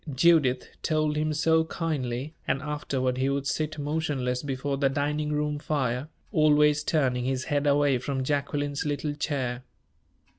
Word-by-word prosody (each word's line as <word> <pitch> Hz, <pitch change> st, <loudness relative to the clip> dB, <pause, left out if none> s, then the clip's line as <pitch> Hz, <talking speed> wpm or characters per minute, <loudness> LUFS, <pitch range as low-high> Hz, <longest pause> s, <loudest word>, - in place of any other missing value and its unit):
Judith 140 Hz, -4 st, +4 dB
told 155 Hz, -1 st, +1 dB
him 155 Hz, +1 st, 0 dB
so 160 Hz, +2 st, +3 dB
kindly, 145 Hz, -4 st, -3 dB
and -, -, +1 dB
afterward 135 Hz, -4 st, -2 dB
he 135 Hz, +1 st, +2 dB
would 140 Hz, 0 st, -1 dB
sit 155 Hz, +2 st, -1 dB
motionless 145 Hz, -4 st, -1 dB
before 140 Hz, 0 st, -2 dB
the 135 Hz, -1 st, +2 dB
dining 150 Hz, +2 st, -1 dB
room 150 Hz, 0 st, -1 dB
fire, 135 Hz, -3 st, -1 dB, 0.2 s
always 150 Hz, -3 st, +4 dB
turning 130 Hz, -7 st, +1 dB
his 130 Hz, 0 st, -1 dB
head 145 Hz, 0 st, 0 dB
away 140 Hz, -2 st, +3 dB
from 135 Hz, +1 st, -2 dB
Jacqueline's 145 Hz, 0 st, -1 dB
little 145 Hz, 0 st, -2 dB
chair. 130 Hz, -4 st, -2 dB
145 Hz, 145 wpm, -27 LUFS, 130-150 Hz, 0.2 s, Judith